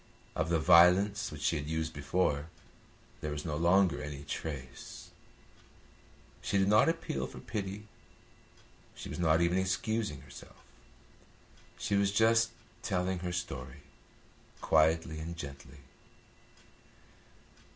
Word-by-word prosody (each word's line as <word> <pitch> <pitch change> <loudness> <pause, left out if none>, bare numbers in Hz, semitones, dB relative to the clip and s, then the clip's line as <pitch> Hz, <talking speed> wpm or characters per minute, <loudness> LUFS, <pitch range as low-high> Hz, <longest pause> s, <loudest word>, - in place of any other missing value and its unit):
Of 80 +1 -1
the 85 - +3
violence 90 +5 +5
which 75 -1 -8
she 80 - +2
had 75 0 -5
used 80 0 -2
before 75 0 0 0.7
there 75 - -4
was 75 +1 -4
no 75 -3 -2
longer 85 -1 +3
any 75 -1 -6
trace. 70 -3 -7 1.3
She 100 - 0
did 95 0 +3
not 105 +9 +5
appeal 65 - -2
for 65 - -12
pity, 105 +1 -5 1.1
she - - -8
was - - -6
not 80 -1 +3
even 85 +2 +2
excusing 95 -3 -1
herself; - - -14 1.1
she 115 -2 -3
was 100 0 +2
just 115 +2 +4 0.3
telling 90 0 -1
her 90 0 -3
story 70 -8 -5 0.8
quietly 80 0 +2
and 85 +2 -6
gently. 70 -2 -9
85 Hz, 120 wpm, -32 LUFS, 75-95 Hz, 1.3 s, violence